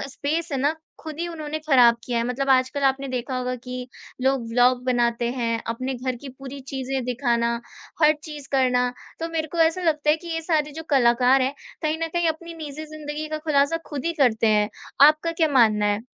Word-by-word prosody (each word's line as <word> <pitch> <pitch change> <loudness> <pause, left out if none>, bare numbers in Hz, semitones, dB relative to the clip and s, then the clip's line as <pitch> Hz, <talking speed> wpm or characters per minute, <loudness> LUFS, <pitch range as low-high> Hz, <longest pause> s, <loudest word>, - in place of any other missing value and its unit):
Space 300 +4 -3
है 275 - 0
ना, 290 +4 +1 0.3
खुद 315 -1 -8
ही 345 - -1
उन्होंने 310 -2 -5
खराब 245 -5 +6
किया 240 -2 -1
है। 230 - 0
मतलब 270 +2 -1
आजकल 260 +2 +2
आपने 270 +1 +1
देखा 255 0 -3
होगा 255 0 -2
कि 250 0 -5 0.4
लोग 265 -3 +1
व्लॉग 245 +1 +3
बनाते 240 -1 +1
हैं, 230 -3 -1
अपने 255 +3 -2
घर 255 0 -3
की 285 - -8
पूरी 275 0 -8
चीज़ें 265 -1 -2
दिखाना, 240 -2 0 0.5
हर 305 0 +7
चीज़ 295 -3 -8
करना, 250 -2 +2 0.3
तो 330 - -2
मेरे 320 -1 -2
को 340 - -4
ऐसा 325 +2 +3
लगता 300 -3 +2
है 305 - +4
कि 340 +1 -11
ये 325 - -1
सारे 300 -3 +1
जो 320 +2 -7
कलाकार 255 0 +4
हैं, 265 +2 -1 0.3
कहीं 310 0 0
न 330 - 0
कहीं 345 -1 +2
अपनी 335 +1 -4
निजी 300 +2 -7
ज़िंदगी 300 0 -5
का 310 0 -3
खुलासा 300 0 +2
खुद 290 -2 -5
ही 335 - +1
करते 230 -3 +3
हैं। 210 0 +2 0.4
आपका 310 +2 0
क्या 325 -1 +2
मानना 215 -3 +4
है? 205 +3 -1
270 Hz, 205 wpm, -24 LUFS, 250-310 Hz, 0.5 s, हर